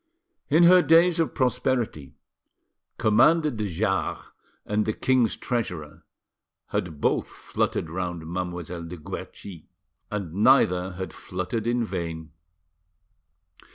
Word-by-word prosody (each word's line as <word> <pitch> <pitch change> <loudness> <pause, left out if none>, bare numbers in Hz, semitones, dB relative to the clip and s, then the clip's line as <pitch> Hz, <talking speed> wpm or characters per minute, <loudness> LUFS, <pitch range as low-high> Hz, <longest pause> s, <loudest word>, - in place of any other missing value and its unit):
In 160 +4 +5
her 180 +1 +8
days 170 +1 +4
of 165 - 0
prosperity 125 - -1 0.8
Commander 150 +9 +4
de 110 -3 -3
Jars 85 -4 -2 0.3
and 105 +1 0
the 110 - +1
king's 130 -2 +1
treasurer 90 - -4 0.7
had 80 -4 -3
both - - +1
fluttered - - -2
round 85 -1 -4
Mademoiselle 85 0 -5
de 90 +2 -8
Guerchi, 85 +2 -9 0.4
and 100 -6 -4
neither 95 -4 +3
had 95 -2 -6
fluttered 95 +5 -4
in 120 0 +1
vain. 85 -6 -5
100 Hz, 110 wpm, -25 LUFS, 85-125 Hz, 0.8 s, her